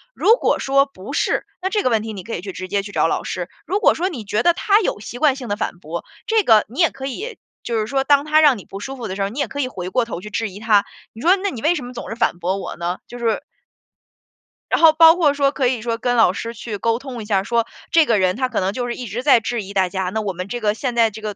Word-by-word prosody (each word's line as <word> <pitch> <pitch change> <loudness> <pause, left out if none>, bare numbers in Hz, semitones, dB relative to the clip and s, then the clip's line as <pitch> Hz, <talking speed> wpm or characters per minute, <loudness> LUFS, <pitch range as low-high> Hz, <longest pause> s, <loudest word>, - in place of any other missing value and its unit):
如 450 - +5
果 - - +1
说 275 +1 +3
不 245 -2 -10
是， - - 0 0.2
那 380 - -1
这 415 +1 0
个 - - +2
问 220 -2 +2
题， 220 +1 -5
你 195 -3 -7
可 225 - -7
以 - - -5
去 195 +1 -6
直 185 0 -7
接 200 +1 0
去 205 - -8
找 165 - +2
老 - - -1
师， 180 -1 -4 0.2
如 385 +5 0
果 - - +5
说 360 +3 -1
你 265 - -6
觉 210 +1 0
得 345 - +6
他 405 +4 +3
有 360 - -1
习 235 +3 -8
惯 285 -2 +4
性 260 -3 -7
的 205 - -1
反 175 - -3
驳， 170 +1 -6 0.2
这 445 -1 +2
个 220 - +5
你 255 +8 -9
也 335 - +5
可 270 0 -8
以 425 - -5 0.3
就 235 - -2
是 215 - 0
说 270 +3 0
当 285 +1 +3
他 310 0 +4
让 290 -5 +5
你 200 - -11
不 195 - -8
舒 270 +6 -6
服 240 - -5
的 185 - -5
时 200 - -4
候， 195 - 0
你 240 +8 -7
也 285 - 0
可 285 - -7
以 265 - 0
回 185 -8 -6
过 240 +5 +1
头 230 - -6
去 210 - -9
质 225 +1 -2
疑 195 +1 -10
他， 210 -2 +3 0.3
你 225 - -11
说： 355 +6 +5
“那 400 - 0
你 235 - -7
为 330 +6 +3
什 280 -7 -5
么 250 - -9
总 245 - -7
是 225 - -4
反 225 -6 0
驳 185 +3 -1
我 195 - -6
呢？” 175 +1 -2
就 245 - -9
是 230 -2 0 1.3
然 - - +2
后 325 -1 +9
包 325 +1 +7
括 315 -5 +3
说 280 -1 +2
可 270 -3 0
以 245 -2 -1
说 230 0 -2
跟 245 +1 0
老 225 -6 +5
师 230 +4 -5
去 225 -2 -6
沟 230 +3 0
通 255 -3 -7
一 - - -7
下， 200 -2 +1
说 230 +2 +1 0.3
这 330 -2 +5
个 225 -6 +2
人 185 -1 +2
他 255 +2 -1
可 245 - -1
能 190 +1 -1
就 245 +2 -3
是 240 - -3
一 250 - -6
直 225 +5 -4
在 275 -4 +6
质 230 -1 -3
疑 200 +1 -9
大 190 -2 +2
家， 190 -1 -2
那 220 +3 -2
我 200 -3 -3
们 185 +1 -6
这 240 +4 -4
个 210 -2 +1
现 245 +2 -3
在 230 -1 +4
这 215 +1 -10
个 210 -1 -4
230 Hz, 335 characters per minute, -20 LUFS, 200-275 Hz, 1.3 s, 后